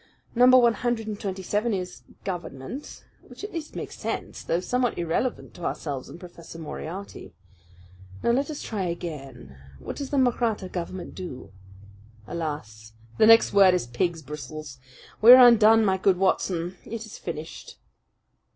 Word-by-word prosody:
Number 250 Hz, +2 st, +7 dB
one 240 Hz, -2 st, +5 dB
hundred 240 Hz, 0 st, -2 dB
and 210 Hz, -1 st, -5 dB
twenty 190 Hz, -1 st, -4 dB
seven 210 Hz, +4 st, 0 dB
is 180 Hz, -11 st, -6 dB, 0.2 s
'Government'; 175 Hz, -, -7 dB, 0.2 s
which -, -, -14 dB
at 415 Hz, -, -6 dB
least 325 Hz, -3 st, -6 dB
makes -, -, -6 dB
sense, -, -, -4 dB
though 165 Hz, -, -1 dB
somewhat 245 Hz, +5 st, -1 dB
irrelevant 175 Hz, +9 st, -2 dB
to 175 Hz, -, -11 dB
ourselves 140 Hz, -6 st, -4 dB
and -, -, -11 dB
Professor 170 Hz, -2 st, -11 dB
Moriarty. 165 Hz, +4 st, -8 dB, 0.9 s
Now -, -, +3 dB
let 275 Hz, +5 st, 0 dB
us 300 Hz, -, -6 dB
try 215 Hz, -3 st, -4 dB
again. 150 Hz, -, -7 dB, 0.2 s
What -, -, -7 dB
does 280 Hz, -2 st, -5 dB
the 285 Hz, -, -1 dB
Mahratta 235 Hz, -6 st, +1 dB
government 180 Hz, 0 st, -6 dB
do? 175 Hz, -, -8 dB, 0.7 s
Alas! 110 Hz, -9 st, -6 dB, 0.3 s
the 215 Hz, -, +6 dB
next 225 Hz, 0 st, +6 dB
word 195 Hz, -2 st, +6 dB
is 180 Hz, -, -1 dB
'pig's 160 Hz, +7 st, -2 dB
bristles.' 150 Hz, -1 st, -8 dB, 0.4 s
We 235 Hz, +3 st, +11 dB
are 255 Hz, -1 st, +10 dB
undone, 225 Hz, -1 st, +6 dB
my 190 Hz, -1 st, +1 dB
good 190 Hz, -1 st, +3 dB
Watson! 180 Hz, -1 st, 0 dB
It 230 Hz, 0 st, -6 dB
is 220 Hz, -, -11 dB
finished!" 160 Hz, -2 st, -7 dB
185 Hz, 155 wpm, -25 LUFS, 160-230 Hz, 0.9 s, We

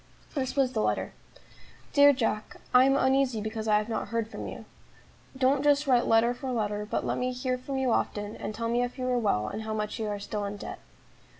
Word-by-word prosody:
This 265 Hz, -3 st, -2 dB
was 265 Hz, -2 st, +2 dB
the 220 Hz, -, 0 dB
letter: -, -, -1 dB, 0.8 s
"DEAR 285 Hz, 0 st, +8 dB
JACK, 225 Hz, -5 st, -2 dB, 0.2 s
"I 250 Hz, +1 st, +7 dB
am 270 Hz, +1 st, +4 dB
uneasy 265 Hz, -3 st, +2 dB
because 220 Hz, +1 st, -4 dB
I 210 Hz, -1 st, +5 dB
have 210 Hz, 0 st, -1 dB
not 225 Hz, -, -3 dB
heard 230 Hz, -1 st, -1 dB
from -, -, -6 dB
you. -, -, -8 dB, 0.7 s
Don't 265 Hz, +1 st, +3 dB
just 290 Hz, 0 st, +3 dB
write 250 Hz, -3 st, +3 dB
letter 225 Hz, +2 st, +4 dB
for 260 Hz, +1 st, -5 dB
letter, 210 Hz, -3 st, -2 dB
but -, -, -1 dB
let -, -, -1 dB
me 250 Hz, 0 st, 0 dB
hear 255 Hz, 0 st, -1 dB
from 260 Hz, +2 st, -5 dB
you 260 Hz, -2 st, +1 dB
often, 205 Hz, -1 st, -1 dB
and 215 Hz, -, -5 dB
tell 230 Hz, +1 st, -2 dB
me 240 Hz, +1 st, +1 dB
if 245 Hz, +2 st, -3 dB
you 255 Hz, -, -3 dB
are 250 Hz, -1 st, +2 dB
well, 105 Hz, -, +1 dB
and 215 Hz, -, -4 dB
how 220 Hz, 0 st, -3 dB
much 210 Hz, +1 st, -3 dB
you 220 Hz, -, -2 dB
are 205 Hz, -1 st, -2 dB
still 205 Hz, +1 st, -4 dB
in 200 Hz, +1 st, -5 dB
debt. -, -, -7 dB
240 Hz, 230 wpm, -28 LUFS, 215-260 Hz, 0.8 s, DEAR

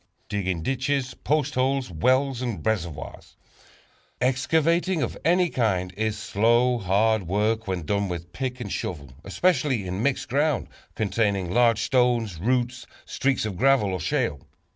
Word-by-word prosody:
Digging 95 Hz, -5 st, -2 dB
Ditches, 135 Hz, -, -1 dB
Post 150 Hz, +3 st, -1 dB
Holes, 130 Hz, -3 st, 0 dB
Wells 130 Hz, -, +1 dB
and 120 Hz, -5 st, -4 dB
Reservoirs. 85 Hz, -, -4 dB, 0.8 s
Excavating 160 Hz, +7 st, +1 dB
of -, -, -3 dB
any 175 Hz, +2 st, +3 dB
kind 95 Hz, -, -1 dB
is 110 Hz, +1 st, -1 dB
slow, 120 Hz, +3 st, +2 dB
hard 100 Hz, +1 st, +1 dB
work 110 Hz, +4 st, 0 dB
when 90 Hz, -4 st, -3 dB
done 100 Hz, +3 st, 0 dB
with 85 Hz, 0 st, -6 dB
pick 130 Hz, +1 st, -4 dB
and 105 Hz, -5 st, -5 dB
shovel, 70 Hz, -6 st, -5 dB
especially 135 Hz, -, +1 dB
in 90 Hz, +2 st, -3 dB
mixed 140 Hz, +2 st, 0 dB
ground 145 Hz, +1 st, 0 dB, 0.3 s
containing 100 Hz, -3 st, 0 dB
large 115 Hz, -1 st, +3 dB
stones, 120 Hz, -8 st, +1 dB
roots, 125 Hz, +4 st, -1 dB, 0.2 s
streaks 135 Hz, -4 st, 0 dB
of 100 Hz, -4 st, -4 dB
gravel 130 Hz, -6 st, +3 dB
or 95 Hz, -, -2 dB
shale. 75 Hz, -2 st, -2 dB
115 Hz, 140 wpm, -25 LUFS, 95-130 Hz, 0.8 s, any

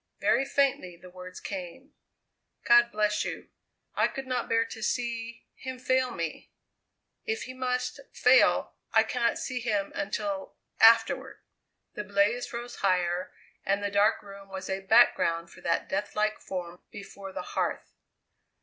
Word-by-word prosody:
Very 270 Hz, -, +2 dB
faintly 265 Hz, -11 st, 0 dB
the 180 Hz, +1 st, -14 dB
words 185 Hz, 0 st, -10 dB
came: 200 Hz, -, -7 dB, 0.7 s
"God 240 Hz, 0 st, +6 dB
bless 210 Hz, 0 st, +1 dB
you! -, -, -6 dB, 0.4 s
I -, -, +3 dB
could 270 Hz, -, -6 dB
not 255 Hz, -1 st, -2 dB
bear 230 Hz, 0 st, +3 dB
to 220 Hz, -, -9 dB
see 235 Hz, 0 st, -3 dB
him 260 Hz, -1 st, -7 dB
fail 260 Hz, 0 st, +1 dB
me. 170 Hz, -9 st, -5 dB, 0.8 s
If 445 Hz, -1 st, -2 dB
he 255 Hz, -, -7 dB
must 255 Hz, -1 st, -2 dB
fail, -, -, +4 dB, 0.2 s
I 220 Hz, -, +6 dB
cannot 235 Hz, +1 st, 0 dB
see 255 Hz, -2 st, -3 dB
him 210 Hz, -4 st, -1 dB
until 200 Hz, -1 st, -3 dB, 0.2 s
afterward." 225 Hz, 0 st, +5 dB, 0.6 s
The 210 Hz, -, -4 dB
blaze 205 Hz, +6 st, +1 dB
rose 240 Hz, 0 st, -6 dB
higher, 180 Hz, -2 st, 0 dB, 0.3 s
and 200 Hz, +1 st, 0 dB
the 205 Hz, -, -1 dB
dark 205 Hz, +2 st, +3 dB
room 200 Hz, -1 st, -12 dB
was 190 Hz, 0 st, -6 dB
a 190 Hz, -, -1 dB
background 190 Hz, -5 st, +3 dB
for -, -, -15 dB
that 170 Hz, -, 0 dB
deathlike 210 Hz, +2 st, -1 dB
form 180 Hz, -2 st, -6 dB
before 200 Hz, -1 st, -9 dB
the -, -, -5 dB
hearth. -, -, -2 dB
210 Hz, 145 wpm, -28 LUFS, 190-240 Hz, 0.8 s, God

